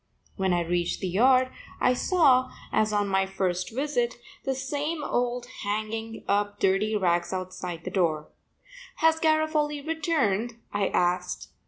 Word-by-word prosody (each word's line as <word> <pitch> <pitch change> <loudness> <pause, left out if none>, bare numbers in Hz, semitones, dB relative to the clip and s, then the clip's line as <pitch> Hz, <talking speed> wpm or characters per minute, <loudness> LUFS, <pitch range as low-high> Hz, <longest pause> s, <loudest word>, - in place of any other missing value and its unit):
When 190 -2 0
I 175 -1 +2
reached 175 0 -1
the 190 - -2
yard 255 +7 +4 0.3
I 250 - +4
saw, 260 -3 +3 0.2
as 215 0 +2
on 205 -1 +1
my 190 0 +1
first 185 -1 -2
visit, 245 -2 -1 0.3
the 270 - 0
same 290 +4 -3
old 245 -1 -1
man 210 -3 -3
hanging 225 0 -5
up 205 0 0
dirty 195 +3 +2
rags 175 -4 +1
outside 185 -2 -5
the 185 - -5
door. 160 -5 0 0.7
"Has 320 0 +3
Garofoli 310 -2 +1
returned?" 275 - 0 0.2
I 200 -1 +1
asked. 180 0 0
215 Hz, 145 wpm, -27 LUFS, 185-270 Hz, 0.7 s, yard